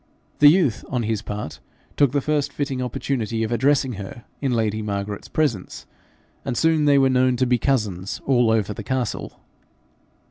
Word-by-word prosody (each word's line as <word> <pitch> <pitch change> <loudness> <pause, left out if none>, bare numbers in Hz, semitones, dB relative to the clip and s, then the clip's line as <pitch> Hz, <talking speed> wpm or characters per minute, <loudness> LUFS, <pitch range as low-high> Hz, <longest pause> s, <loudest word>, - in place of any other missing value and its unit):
The 145 - +8
youth 150 - +2
on 125 -3 -1
his 110 -1 -1
part 105 -6 -6 0.4
took 140 -4 +3
the 140 0 +1
first 150 0 0
fitting 140 -3 -3
opportunity 120 -3 -2
of 110 - -3
addressing 130 +2 +2
her 105 +4 -9 0.2
in 135 -2 0
lady 110 -2 0
Margaret's 100 -1 -4
presence, 120 -12 -2 0.6
and 125 -3 -3
soon 160 -2 +3
they 145 -1 +5
were 135 -1 +5
known 130 -1 +3
to 130 +1 +1
be 125 -1 +2
cousins 105 -9 -1
all 125 -4 +3
over 110 -2 +1
the 110 - -7
castle. 125 0 -3
125 Hz, 170 wpm, -22 LUFS, 110-140 Hz, 0.6 s, The